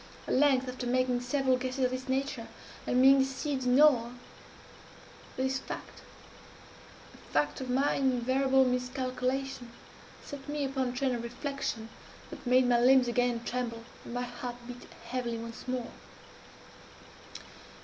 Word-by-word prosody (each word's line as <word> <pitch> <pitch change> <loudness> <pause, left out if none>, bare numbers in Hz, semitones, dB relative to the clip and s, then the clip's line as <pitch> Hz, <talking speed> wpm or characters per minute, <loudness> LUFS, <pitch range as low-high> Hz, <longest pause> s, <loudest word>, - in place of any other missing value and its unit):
At - - -1
length, 265 -1 +4
after 250 -1 -4
making 250 0 +1
several 260 0 +1
guesses 255 +1 -1
of 250 - 0
this 255 +1 -5
nature, 265 -3 -1 0.4
and 250 - +2
being 270 +1 +8
deceived 270 0 -1
in 250 +2 +4
all 245 -6 +5 1.2
this 265 0 0
fact - - -8 1.1
the - - -17
fact 145 - 0
of 260 - -5
my 270 +3 +2
invariable 265 +1 +2
miscalculation, 255 0 -2 0.6
set 285 -1 -8
me 295 -1 -1
upon 265 -1 -1
a - - -3
train 260 0 0
of 240 - -2
reflection 240 -2 -4 0.4
that - - -9
made 250 0 +5
my 240 -1 +4
limbs 255 +1 +6
again 240 -1 +1
tremble, 235 -2 -3 0.2
and 240 - -8
my 245 - -1
heart 245 0 -6
beat 245 0 -9 0.2
heavily 240 -2 -3
once 230 +2 -8
more. 250 -2 -3
255 Hz, 140 wpm, -30 LUFS, 245-265 Hz, 1.2 s, being